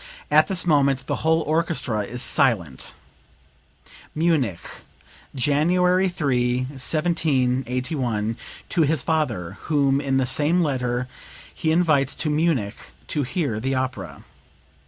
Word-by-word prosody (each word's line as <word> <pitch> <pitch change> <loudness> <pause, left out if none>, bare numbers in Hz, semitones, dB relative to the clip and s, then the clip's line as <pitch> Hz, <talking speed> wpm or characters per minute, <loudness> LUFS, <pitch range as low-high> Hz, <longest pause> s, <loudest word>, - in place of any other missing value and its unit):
At - - +5
this 185 -3 +1
moment 140 -4 +2
the - - -2
whole 160 +1 +2
orchestra 155 -7 0
is 120 +5 -3
silent." 100 - +1 1.2
(Munich, 150 - +1 0.7
January 180 +7 +2
3, 125 -7 0
1781, 130 -5 -1 0.3
to 175 - +1
his 150 -3 +2
father, 150 - -2
whom 140 -2 +2
in 135 -2 0
the 130 - +2
same 150 +7 +2
letter 125 -4 -1 0.5
he 160 - -1
invites 155 -5 +2
to 155 - -1
Munich 150 -10 0 0.3
to 150 - 0
hear 140 - -2
the 135 +4 -1
opera.) 130 0 -4
140 Hz, 115 wpm, -23 LUFS, 125-160 Hz, 1.2 s, At